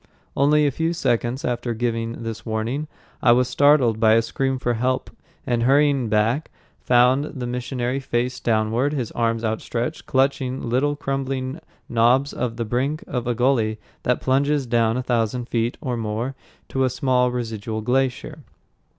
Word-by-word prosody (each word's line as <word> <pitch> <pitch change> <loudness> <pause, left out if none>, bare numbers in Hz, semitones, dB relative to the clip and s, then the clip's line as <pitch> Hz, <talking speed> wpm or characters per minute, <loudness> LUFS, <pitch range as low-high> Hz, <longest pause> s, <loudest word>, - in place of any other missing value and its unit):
Only 150 +2 +4
a 145 - +2
few 165 +5 -1
seconds 125 -4 -1
after 120 -1 -2
giving 115 0 -2
this 115 -1 -5
warning, 115 +7 -2 0.3
I 120 - +6
was 125 +1 +3
startled 140 -7 +4
by 110 -1 +5
a 115 0 +4
scream 135 +2 -1
for 120 -1 -1
help, 130 +3 -1 0.3
and 120 -1 0
hurrying 140 -1 +3
back, 110 +8 +1 0.3
found 125 +3 +3
the 130 -5 -6
missionary 125 +1 -2
face 125 -1 -2
downward, 115 +5 +1
his 125 -6 -3
arms 115 -1 0
outstretched, 115 +2 -3
clutching 130 -1 +1
little 135 +5 +1
crumbling 135 0 -3 0.3
knobs 120 +4 +3
on 120 -2 -2
the 115 0 -3
brink 135 +7 -1
of 125 -3 -3
a 120 - 0
gully 115 -3 +1 0.2
that 125 - 0
plunges 140 +1 +1
down 115 -1 +2
a 130 - -2
thousand 120 0 -1
feet 115 +1 -1
or 125 -2 -2
more 115 +3 -3 0.4
to 135 - 0
a 130 - +3
small 125 -1 +1
residual 110 -3 -4
glacier. 125 +2 -1
125 Hz, 160 wpm, -22 LUFS, 115-135 Hz, 0.4 s, I